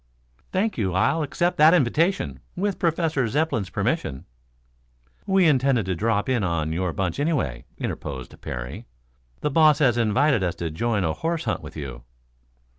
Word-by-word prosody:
"Thank 205 - 0
you; 95 -4 0
I'll 115 +12 +2
accept 175 +4 0
that 155 +3 +7
invitation, 165 +6 +1 0.2
with 200 +1 -1
Professor 160 -6 +1
Zepplin's 130 - 0
permission." 65 - -2 1.0
"We 190 -2 +4
intended 135 - +3
to 95 - -1
drop 105 +3 0
in 125 -5 +1
on 80 -3 -1
your 90 +1 -1
bunch, 90 - -2
anyway," 140 - -1
interposed 65 -3 -6
Parry. - - -6 0.5
"The 150 - 0
boss 155 -1 +5
has 125 -5 +3
invited 120 +3 +3
us 90 -2 -1
to 85 -2 -4
join 105 +4 0
a 80 -2 0
horse 165 - -2
hunt - - -2
with - - -10
you." 65 -5 -6
120 Hz, 155 wpm, -24 LUFS, -, 1.0 s, that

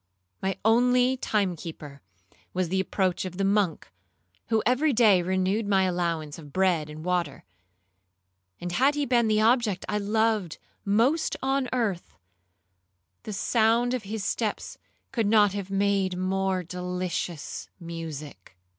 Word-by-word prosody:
My 190 0 -1
only 250 +3 +4
time 205 -7 0
keeper 150 -4 -9 0.5
was 185 -2 0
the 190 +2 0
approach 190 -1 0
of 180 -1 -6
the 195 - 0
monk, 195 -4 0 0.6
who 225 -1 +1
every 265 +5 +2
day 215 -6 +5
renewed 190 +4 0
my 195 -2 +3
allowance 170 -4 -2
of 145 -3 -12
bread 175 -4 +1
and 155 +2 -9
water; 175 -6 -1 1.2
and 175 0 -4
had 270 +10 +3
he 290 -1 0
been 235 -3 +2
the 215 0 +2
object 225 -4 +2
I 210 - -1
loved 215 -4 0 0.3
most 235 +11 +2
on 270 -1 0
earth, 220 -8 -2 1.1
the 215 - -6
sound 230 +4 +2
of 255 - -1
his 210 0 -5
steps 215 +2 -2 0.3
could 230 -5 0
not 205 -2 +4
have 200 -2 -4
made 195 -2 +1
more 190 0 0
delicious 180 -2 -4
music. 155 - -8
195 Hz, 135 wpm, -26 LUFS, 180-225 Hz, 1.2 s, day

